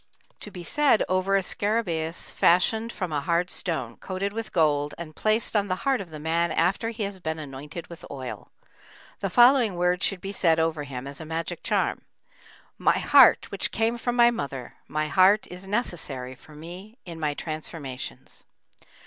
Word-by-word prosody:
To - - -8
be 180 -3 -9
said 285 - +3
over 185 +1 +1
a 195 - +3
scarabæus 180 -6 -2
fashioned 220 +6 +3
from 185 -7 -4
a 145 -2 0
hard 170 +4 0
stone, 130 -10 -2
coated 195 +1 -3
with 225 0 -5
gold, 150 -3 +2
and 160 -2 -8
placed 215 +1 +1
on 205 -1 +2
the 185 - 0
heart 270 -5 +2
of 185 - -9
the 155 -1 -8
man 165 +2 0
after 205 +5 +1
he 230 -1 -4
has 200 -1 -4
been 160 -2 -3
anointed 150 +2 -7
with 170 - -12
oil. 130 -3 -7 0.7
The 195 - -2
following 240 -1 +5
words 180 +1 +1
should 195 - +1
be 195 +2 -5
said 165 -5 +2
over 160 -2 0
him 130 -2 -6
as 140 +3 -7
a - - -5
magic 165 +2 -4
charm: - - 0 0.8
"My - - +3
heart - - +6
which - - -2
came 225 +1 0
from 240 0 -2
my 240 0 +6
mother, 140 - -5
my 155 0 -1
heart 190 +6 +5
is 180 +2 -9
necessary 160 - -3
for 150 +4 -16
me 180 +9 -10
in 170 -2 -8
my 150 -2 -1
transformations." 155 -4 -7
175 Hz, 180 wpm, -26 LUFS, 155-205 Hz, 0.8 s, heart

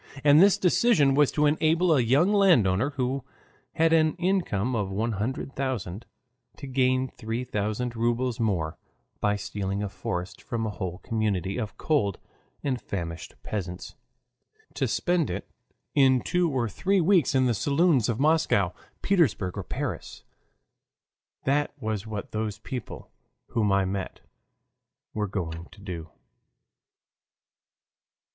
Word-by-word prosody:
And 145 +2 +7
this 200 +1 +6
decision 180 - +4
was 145 0 +4
to 150 - +2
enable 160 +3 +3
a 135 - +4
young 140 - +3
landowner, 140 - +4
who 135 -2 -2 0.5
had 165 0 +3
an 155 -1 +3
income 170 - 0
of 105 -4 -1
one 110 +5 -1
hundred 115 +6 -3
thousand, 120 -7 -3 0.5
to 140 - -8
gain 130 0 +1
three 115 0 -4
thousand 115 +1 -2
rubles 120 +1 0
more 90 -9 -1 0.4
by 105 0 +1
stealing 100 0 -3
a 100 - -2
forest 90 -1 -5
from 115 -1 -3
a 110 - -2
whole 90 -4 -5
community 105 -3 -1
of 110 -3 -5
cold 130 - +1 0.5
and 130 -5 -1
famished 85 -3 -5
peasants, 90 -4 -5 0.8
to - - 0
spend 175 -3 +1
it, - - -4 0.5
in 130 -3 +4
two 180 -1 +1
or 130 -5 0
three 190 - +1
weeks 175 -5 +3
in 130 -1 +4
the 120 - +2
saloons 140 - +2
of 115 0 -1
Moscow, 145 - +3 0.3
Petersburg, 140 - +2
or 100 - -3
Paris. 80 - -5 1.2
That 145 +2 +1
was 110 -1 -3
what 105 -2 -5
those 110 -1 -3
people 130 -3 -7 0.4
whom 105 -4 +1
I 100 -1 +3
met 95 0 -4 0.9
were 105 -1 -1
going 85 -4 -4
to 100 - -16
do. 90 -5 -7
120 Hz, 135 wpm, -27 LUFS, 100-145 Hz, 1.2 s, And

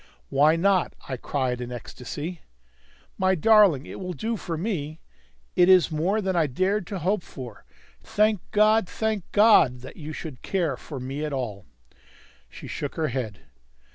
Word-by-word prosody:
"Why 150 +3 +4
not?" 185 +1 +2
I 130 - -3
cried 125 -1 -2
in 125 - -5
an 125 - -5
ecstasy. 145 +8 -7 0.8
"My 190 0 +3
darling, 190 -6 +5
it - - -8
will 180 -1 -4
do 225 +5 -2
for 170 -5 -4
me! 160 -5 -3 0.6
It 180 +1 +5
is 185 -3 +6
more 180 +8 0
than 190 -2 -1
I 165 -3 +3
dared 185 +7 0
to 200 - -4
hope 185 +4 0
for; 125 -8 -10 0.4
thank 215 -3 +1
God, 215 -1 +3
thank 220 -4 -2
God, 205 - +5
that 130 - -11
you 155 -1 -7
should 155 -4 -8
care 170 -8 -1
for 140 +2 -8
me 135 +4 -4
at 150 -2 -3
all!" 110 -8 -4 0.8
She - - -11
shook 145 - -5
her 160 -1 -1
head. 115 -6 -4
165 Hz, 170 wpm, -25 LUFS, 135-195 Hz, 0.8 s, is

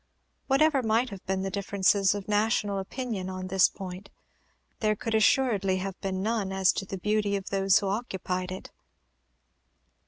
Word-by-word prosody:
Whatever 280 +1 +3
might 230 +1 +1
have 195 -2 -9
been 190 0 -1
the 195 - -3
differences 200 0 +2
of 205 0 -6
national 210 -1 +1
opinion 195 -2 -4
on 185 0 -5
this 190 0 +4
point, 190 +1 -8 0.7
there 215 -2 +1
could 225 +1 -4
assuredly 220 -4 +3
have 190 0 -5
been 190 -1 -2
none 215 -3 -1
as 190 -1 +3
to 195 - -4
the 195 - -5
beauty 210 +1 0
of 195 -1 -5
those 195 -1 +4
who 200 - -1
occupied 190 -4 -3
it. 185 - -8
200 Hz, 160 wpm, -28 LUFS, 190-215 Hz, 0.7 s, this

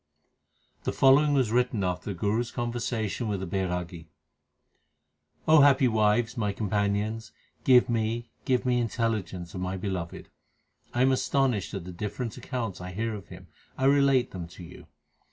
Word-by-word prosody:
The - - -1
following 145 +2 +5
was 130 -5 +2
written 120 -3 +1
after 90 -1 -2
the 95 - -4
Guru 105 +2 +1
s 120 -1 -2
con 120 -1 -3
versation 115 -1 -2
with 100 -2 -2
a - - -2
Bairagi: 90 -3 -3 1.4
happy 140 -4 +6
wives, 110 +1 +2
my 105 -3 0
companions, 105 +2 -1 0.3
give 125 -2 +6
me, 115 0 -1
give 125 -2 +1
me 125 -1 +2
intelli 115 -2 0
gence 85 -2 -9
of 90 - -5
my 90 +1 -2
Beloved. 90 -3 -5 0.6
1 125 - +2
am 135 - +4
astonished 130 -5 0
at 95 -3 -5
the 90 - -7
different 105 +5 -4
accounts 115 -8 -4
I 90 +1 -7
hear 110 +3 -2
of 100 -5 -8
Him; - - -11 0.3
I 130 - 0
relate 140 -2 +4
them 90 -3 -6
to 90 +1 -12
you. 85 +1 -12
110 Hz, 165 wpm, -27 LUFS, 95-125 Hz, 1.4 s, happy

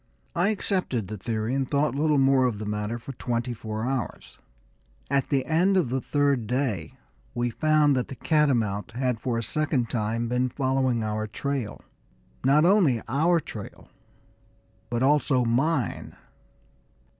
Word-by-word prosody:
I 180 +4 +2
accepted 185 - -1
the 110 - -5
theory, 110 +2 -2
and 135 -1 -1
thought 145 0 +1
little 150 +1 +2
more 135 -1 +4
of 115 -4 -2
the 110 - -5
matter 105 +2 -2
for 120 +4 -8
twenty 120 0 -2
four 110 -1 -5
hours. 130 -7 -4 0.7
At 140 -1 +1
the 135 -3 +1
end 180 +5 +3
of 165 -10 +1
the 130 +1 -1
third 140 -6 +1
day 120 - -2 0.4
we 120 0 0
found 155 +1 +3
that 125 - -1
the 135 - -7
catamount 120 -9 +1
had 125 -2 -1
for 120 0 -2
a 115 - -2
second 135 -1 -1
time 115 +1 -1
been 125 +2 0
following 130 -3 0
our 110 0 -2
trail 135 0 -4 0.6
not 145 +4 +4
only 175 - +4
our 165 +8 +2
trail, 110 -9 -9 1.0
but 120 +1 -1
also 135 -3 +3
_mine. 130 +3 0
130 Hz, 150 wpm, -26 LUFS, 115-145 Hz, 1.0 s, more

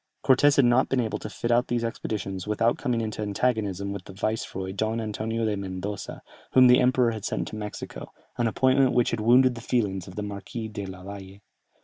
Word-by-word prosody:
Cortès 140 +2 +5
had 140 - +5
not 120 +2 +3
been 135 - +1
able 115 -3 -1
to 110 - -6
fit 120 +3 -3
out 120 +1 +3
these 120 -1 -1
expeditions 100 -4 -4
without 115 +3 +1
coming 120 -2 0
into 110 -1 -4
antagonism 100 -2 -1
with 100 -2 -7
the 95 - -10
viceroy 95 -2 -3
Don 110 +3 -1
Antonio 110 +1 -2
de 105 -1 0
Mendoza, 100 +1 -5 0.3
whom 130 -1 +7
the 125 0 +7
emperor 125 -1 +3
had 110 -3 -6
sent - - -2
to - - -8
Mexico, 105 -1 -7 0.2
an 120 -2 +1
appointment 130 +3 +3
which 120 -1 +2
had 115 - -1
wounded 125 +4 +5
the 115 - -8
feelings 100 -7 -1
of 95 - -10
the 105 - -3
Marquis 105 +3 -6
della 95 -3 -7
Valle. 100 0 -9
110 Hz, 205 wpm, -26 LUFS, 100-120 Hz, 0.3 s, whom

